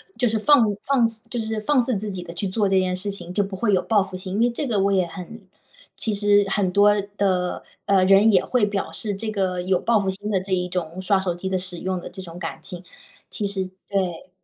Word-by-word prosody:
就 245 - +1
是 220 - 0
放 290 +4 +5 0.2
放 260 -4 +3 0.2
就 245 - -2
是 220 0 -3
放 265 +4 +2
肆 240 -3 +2
自 210 0 -4
己 185 -1 -5
的 175 - -8
去 195 +3 -2
做 200 +1 0
这 190 - +3
件 185 -1 0
事 200 +3 -1
情 180 -3 -6
就 205 - +2
不 195 0 -6
会 210 +1 +1
有 185 - +3
报 210 -3 +2
复 190 - -9
心， 185 +1 -5
因 220 - +1
为 240 - +4
这 275 +4 -3
个 220 -5 +1
我 200 +1 +2
也 185 -3 +2
很 190 +6 -9 0.5
其 220 - 0
实 205 0 +3
很 195 -3 +1
多 205 +2 +5 0.2
的， 185 -3 0 0.2
呃， 190 -2 +4
人 195 +3 +6
也 185 -3 +3
会 250 -3 +1
表 205 -1 -3
示 210 -3 -4
这 215 +2 -3
个 190 -3 -1
有 185 0 +1
报 230 -2 +2
复 190 -1 0
心 205 +2 -6
的 200 -3 +2
这 190 +1 -4
一 180 -1 0
种 180 0 -4
刷 195 +1 +2
手 185 -2 -1
机 190 +2 -5
的 190 - 0
使 180 -1 -3
用 185 0 -2
的 - - -8
这 190 - -8
种 170 -1 -9
感 165 -2 -5
情。 180 +1 -8 0.4
其 190 +3 -3
实 195 -1 -2 0.2
对。 185 -4 -2
195 Hz, 275 characters per minute, -23 LUFS, 185-210 Hz, 0.5 s, 人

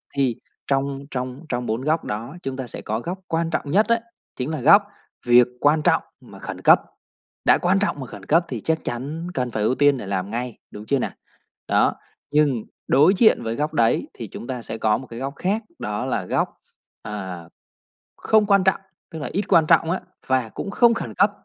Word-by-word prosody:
Thì 130 -5 +1 0.3
trong 135 0 0
trong 130 +4 -5
trong 120 0 -2
4 115 +2 -2
góc 155 +3 0
đó, 115 +9 -5
chúng 135 0 -4
ta 130 - -4
sẽ - - -7
có 110 +2 -2
góc 180 +8 -5
quan 165 0 0
trọng 145 -3 -2
nhất 210 +6 +4
ấy, 230 0 +4 0.4
chính 130 +3 -3
là 155 -5 -3
góc, 200 - +7 0.4
việc 120 0 +7
quan 150 +2 +3
trọng - - +3 0.2
mà - - -14
khẩn - - -7
cấp, - - +6 0.6
đã - - +6
quan 185 +2 +2
trọng 200 -8 -1
mà 130 - -6
khẩn 100 -3 -11
cấp, 165 - +3
thì 120 -5 -4
chắc 160 0 0
chắn 145 +8 -4
cần 125 -2 -2
phải 110 -1 -1
ưu 120 +4 +2
tiên 145 -1 +4
để 120 - -6
làm 95 0 -2
ngay, 120 0 -4
đúng 105 +1 -9
chưa 140 +1 +1
nào? - - -2 0.6
Đó, - - +3 0.4
nhưng 145 -6 +2 0.2
đối 150 +8 +5
diện 220 - +5
với 115 0 -2
góc 150 +3 -2
đấy, 115 -4 +2
thì 115 - -7
chúng 115 - -9
ta 125 -2 -4
sẽ 115 - -6
có 110 -1 +2
một 130 - -9
cái 115 +1 -8
góc 135 +1 -4
khác, 205 +5 -1 0.2
đó 105 0 -3
là - - -2
góc, - - 0 0.5
ờ, 95 -5 -6 0.7
không 220 -1 +3
quan 200 -2 +4
trọng, 190 0 +3 0.3
tức 160 - -6
là 145 - -4
ít 200 - 0
quan 160 - +5
trọng 165 0 +4
á, 185 - -1 0.3
và 130 -4 +1
cũng 200 - -6
không 235 +1 +5
khẩn - - -4
cấp, 200 +2 +4
135 Hz, 220 wpm, -23 LUFS, 120-165 Hz, 0.7 s, góc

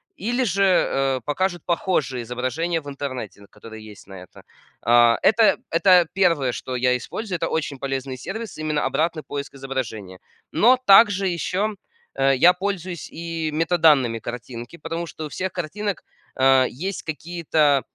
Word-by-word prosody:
Или 240 +6 -1
же, 195 0 +1
э, 135 -8 +2
покажут 175 +3 -1
похожие 165 -8 -1
изображения 130 +8 -2
в 145 - -14
интернете, 130 -7 -6
н 100 - -16
которые 110 -1 -12
есть 105 - -15
на 95 - -12
это. - - -17 0.4
А, 120 0 +5
это 220 +2 +4
это 180 +1 +5
1, 165 -9 +2
что 130 +1 -6
я 125 0 +2
использую. 185 - -4
Это - - -1
очень 145 -4 -2
полезный 135 -1 -4
сервис, 220 - -7
именно 155 -1 -1
обратный 160 -1 -1
поиск 140 0 -6
изображения. 115 -9 -5 0.3
Но 250 +3 +5
также 195 -1 +6
еще, 185 +5 -1 0.4
э, 135 0 +3
я 180 +6 +6
пользуюсь 185 -2 -4
и 165 -1 -4
метаданными 155 -7 +3
картинки, 120 +5 -8
потому 165 +2 -5
что 160 -1 -8
у - - -7
всех 185 +3 -4
картинок, 190 +4 -4 0.4
э, 130 -1 +5
есть 185 +9 -5
какие-то, 155 -3 0
155 Hz, 150 wpm, -22 LUFS, 130-180 Hz, 0.4 s, также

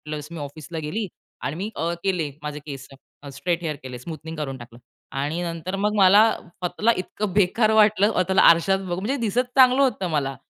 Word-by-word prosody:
Plus 150 -1 -5
मी 170 - -7
ऑफिसला 150 +3 -7
गेली 195 +8 -3 0.4
आणि 135 +4 -3
मी 195 +5 -4
अ 165 +1 -1
केले 175 -6 0
माझे 150 0 -5
केसं, 135 0 -11
स्ट्रेट 170 +5 -2
हेअर 155 -2 -2
केले 125 -1 -7
स्मूथनिंग 160 +3 -8
करून 135 -3 -4
टाकलं. 120 -1 -13 0.3
आणि 145 +5 -2
नंतर 170 +2 -4
मग 205 +2 0
मला 200 +1 +7 0.2
स्वतःला 180 +5 -1
इतकं 190 +2 -4
बेकार 210 +3 +3
वाटलं 215 -1 +4
स्वतःला 190 -1 +2
आरशात 170 +3 +3
बघू 180 -2 -4
म्हणजे 225 +8 -1
दिसत 235 +3 +1
चांगलं 260 +1 +6
होतं 210 -9 +1
मला, 140 -4 -1
170 Hz, 185 wpm, -23 LUFS, 150-200 Hz, 0.4 s, मला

